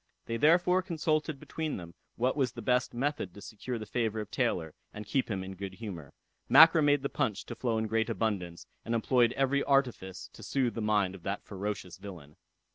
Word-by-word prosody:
They 115 - -2
therefore 175 +6 +4
consulted 155 -4 -1
between 160 +1 -4
them 85 -2 -9 0.2
what 125 +2 +1
was 130 -5 0
the 120 - -8
best 125 +2 +2
method 125 - -2
to - - -10
secure 120 +4 -5
the 110 - -6
favor 110 0 -1
of 105 -1 -6
Taylor, 90 - 0 0.2
and 105 0 -8
keep 130 +4 0
him 95 -3 -2
in 95 0 -7
good 95 0 -7
humor. 90 -9 -7 0.4
Mackra 160 +3 +8
made 145 -2 +3
the - - +1
punch 105 -6 -2
to - - -6
flow 115 -3 -1
in 110 - 0
great 110 +1 0
abundance, 90 -7 -2 0.2
and 115 - -1
employed 120 +1 +3
every 135 +1 +1
artifice 125 -9 0
to - - -13
soothe 130 -4 0
the 115 - -4
mind 105 -3 +2
of 95 - -11
that 100 +3 -3
ferocious 100 -2 -5
villain. 85 -7 -10
115 Hz, 200 wpm, -30 LUFS, 100-135 Hz, 0.4 s, Mackra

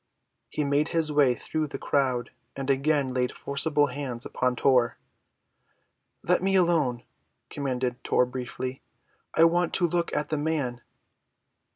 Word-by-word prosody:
He 150 - -2
made 145 +2 +1
his 165 -2 0
way 140 -4 +4
through 155 +6 -3
the - - -6
crowd 130 -4 0 0.2
and 135 0 -1
again 135 -1 +1
laid 125 -1 0
forcible 145 +1 0
hands 130 -3 -5
upon 125 0 0
Tor. 125 -2 +3 1.3
"Let 180 +1 +3
me 195 +1 +1
alone," 160 -10 +2 0.5
commanded 130 -3 -2
Tor 125 - +3
briefly. 125 +1 -5 0.5
"I 160 - +6
want 175 +1 +3
to 175 - +4
look 170 +1 -1
at 150 - -1
the 155 - 0
man." 145 -5 -2
140 Hz, 140 wpm, -27 LUFS, 125-155 Hz, 1.3 s, I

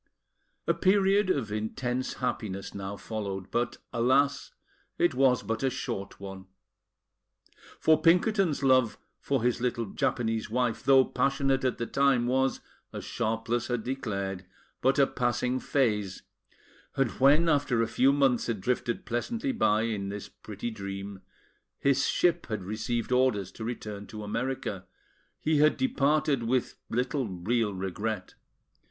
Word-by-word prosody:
A - - +3
period 195 +1 +3
of 130 - 0
intense 120 +4 -2
happiness 105 -6 -3
now 100 0 -5
followed; 100 -4 -5
but, 120 0 -1 0.2
alas! 135 +4 +2 0.5
it 175 - +3
was 130 -2 +3
but 115 0 -2
a 135 - +2
short 100 -5 -5
one. 95 -1 -8 1.3
For 155 -1 +4
Pinkerton's 175 -2 +3
love 130 -5 +4 0.2
for 135 -4 -1
his 125 -1 +1
little 120 -2 0
Japanese 110 +2 -1
wife, 120 +1 0
though 135 -1 +6
passionate 135 -1 +1
at 130 - 0
the 120 - -2
time, 135 -2 +2
was, 130 +2 +1 0.3
as - - -7
Sharpless 115 0 -1
had 120 -3 -2
declared, 100 -8 -3 0.4
but 135 +2 +3
a 140 - +6
passing 125 0 -1
phase; 105 -10 0 0.7
and 135 -4 +1
when, 145 +5 +5
after 140 -6 +2
a - - -1
few 130 +4 +3
months 135 -4 +2
had 115 -4 -1
drifted 120 +3 -1
pleasantly 230 - -2
by 110 - +2
in 105 -4 -2
this 100 0 -6
pretty 105 +2 -7
dream, 100 -1 -6 0.6
his 140 -1 +2
ship 175 -1 +1
had 110 -5 -3
received 110 +4 -3
orders 125 -7 +2
to 110 - -8
return 105 -3 -5
to 105 -1 -8
America, 105 -3 -3 0.5
he 155 -1 +1
had 155 +1 +4
departed 150 - +2
with 120 +2 0 0.2
little 125 +2 -1
real 105 +4 0
regret. 95 +1 -4
120 Hz, 140 wpm, -28 LUFS, 105-135 Hz, 1.3 s, though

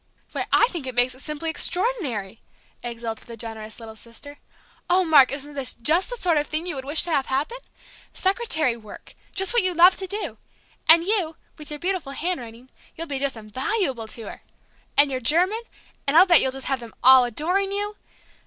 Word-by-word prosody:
"Why, - - -4
I - - +5
think 330 - -6
it 255 - -5
makes 245 +1 +2
it 255 - -16
simply 305 +2 -4
extraordinary!" 320 - -1 0.4
exulted 235 -1 -6
the 230 -1 -10
generous 220 -1 -7
little 225 -1 -10
sister. 240 +6 -12 0.5
"Oh, 365 +1 +3
Mark, 295 -5 +6
isn't 285 +1 -6
this 275 -3 -1
just 315 +10 +2
the - - -5
sort 340 -7 +1
of 295 - -3
thing 310 +2 -3
you 360 - -3
would 265 -2 -7
have - - -13
wished 300 +4 +2
to 345 - -5
happen! 280 - -1 0.5
Secretary 375 - +1
work, 215 -3 -13 0.2
just 385 +2 +2
what 480 - +5
you 370 -2 0
love 355 +2 +7
to 380 - -5
do! 410 +3 -3 0.5
And 330 +1 +8
you, 360 -5 0 0.2
with 300 - -11
your 300 - -6
beautiful 355 -6 -3
handwriting, 255 -7 -5 0.2
you'll 330 - -5
just 280 -3 -2
be - - -9
invaluable 255 - -2
to 225 +1 -8
her! - - -9 0.6
And 285 -1 +5
your 255 -1 -3
German 360 - +3 0.5
and 285 +3 +3
I'll 360 - +9
bet 345 -4 +6
you'll 265 - 0
just 270 0 -7
have 270 -1 -1
them 235 -2 -12
all 260 0 +8
adoring 355 - 0
you 410 +1 -2
290 Hz, 200 wpm, -23 LUFS, 245-360 Hz, 0.6 s, I'll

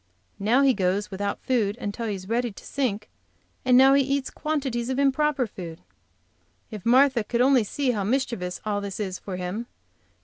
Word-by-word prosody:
Now 230 +7 +3
he 270 -1 +5
goes 200 +1 -1
without 200 +1 -3
food 225 -5 0
until 230 0 -4
he 210 - -2
is 190 -1 -9
ready 235 +2 0
to - - -14
sink, 220 -7 -2 0.6
and 250 -1 +5
now 265 +1 +7
he 280 - +5
eats 275 0 -1
quantities 270 -6 -2
of 260 - -1
improper 280 0 +2
food. 175 -6 -8 0.9
If 210 -1 -6
Martha 260 -1 +5
could 235 +3 -2
only 255 -1 +5
see 260 +5 -1
how 210 -4 -2
mischievous 220 -6 -1
all 205 -1 -1
this 200 0 -6
is 190 -3 -3
for 190 - -6
him. 185 +6 -4
235 Hz, 180 wpm, -25 LUFS, 200-265 Hz, 0.9 s, now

